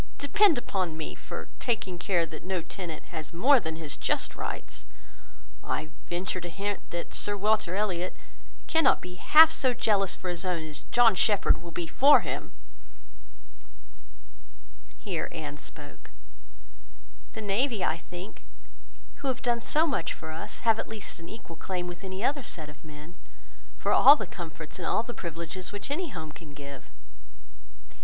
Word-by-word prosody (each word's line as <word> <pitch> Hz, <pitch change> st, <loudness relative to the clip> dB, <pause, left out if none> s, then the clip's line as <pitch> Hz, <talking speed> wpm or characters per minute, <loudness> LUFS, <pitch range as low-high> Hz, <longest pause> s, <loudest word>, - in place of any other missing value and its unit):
Depend 390 Hz, +2 st, +4 dB
upon 185 Hz, -8 st, -2 dB
me 160 Hz, -, -4 dB
for -, -, -7 dB
taking 195 Hz, -7 st, -1 dB
care 175 Hz, -2 st, +1 dB
that 155 Hz, -1 st, -9 dB
no 185 Hz, -2 st, -2 dB
tenant 170 Hz, -4 st, -6 dB
has 155 Hz, -1 st, -4 dB
more 255 Hz, +11 st, +5 dB
than 160 Hz, -6 st, -4 dB
his 160 Hz, -3 st, -4 dB
just -, -, 0 dB
rights. -, -, -5 dB, 0.8 s
I 155 Hz, 0 st, -3 dB, 0.2 s
venture 180 Hz, +1 st, -2 dB
to 175 Hz, -, -5 dB
hint, 200 Hz, +4 st, -4 dB
that 170 Hz, 0 st, -5 dB
Sir 205 Hz, 0 st, 0 dB
Walter 210 Hz, -3 st, +2 dB
Elliot 185 Hz, -3 st, -1 dB, 0.5 s
cannot 325 Hz, 0 st, +4 dB
be 180 Hz, -, -8 dB
half 315 Hz, -, +8 dB
so 260 Hz, -5 st, +2 dB
jealous 195 Hz, -5 st, +2 dB
for 185 Hz, -, -5 dB
his 175 Hz, -1 st, -3 dB
own, 180 Hz, -3 st, -1 dB
as 150 Hz, -2 st, -8 dB
John 240 Hz, -2 st, +6 dB
Shepherd 200 Hz, -3 st, +3 dB
will 170 Hz, -, -8 dB
be 170 Hz, +1 st, -3 dB
for 275 Hz, -, +6 dB
him." -, -, -4 dB, 2.5 s
Here 185 Hz, -6 st, -3 dB
Anne 150 Hz, -3 st, -6 dB
spoke— 145 Hz, -1 st, -11 dB, 1.2 s
"The 220 Hz, -, -5 dB
navy, 215 Hz, +1 st, +1 dB
I 160 Hz, -, +1 dB
think, 180 Hz, +4 st, -9 dB, 0.8 s
who 275 Hz, -, -4 dB
have 260 Hz, 0 st, -1 dB
done 240 Hz, -2 st, +2 dB
so 310 Hz, +7 st, +3 dB
much 275 Hz, -, -1 dB
for 160 Hz, -, -8 dB
us, 160 Hz, -, -7 dB
have 225 Hz, -1 st, +3 dB
at -, -, -4 dB
least 215 Hz, -4 st, -5 dB
an 170 Hz, -, -10 dB
equal 220 Hz, -7 st, -10 dB
claim 180 Hz, +1 st, -3 dB
with 175 Hz, +1 st, -7 dB
any 190 Hz, +2 st, -5 dB
other 280 Hz, +2 st, +1 dB
set 160 Hz, -, -4 dB
of 145 Hz, -1 st, -14 dB
men, 155 Hz, +1 st, -11 dB, 0.6 s
for -, -, 0 dB
all 285 Hz, -, +9 dB
the 215 Hz, -, -4 dB
comforts 165 Hz, -3 st, -8 dB
and -, -, -3 dB
all 220 Hz, -, +2 dB
the 240 Hz, -, -6 dB
privileges 170 Hz, +1 st, -4 dB
which 205 Hz, +7 st, -6 dB
any 340 Hz, +3 st, -1 dB
home 160 Hz, -, -6 dB
can 150 Hz, -2 st, -12 dB
give. 140 Hz, -2 st, -9 dB
185 Hz, 165 wpm, -28 LUFS, 165-225 Hz, 2.5 s, all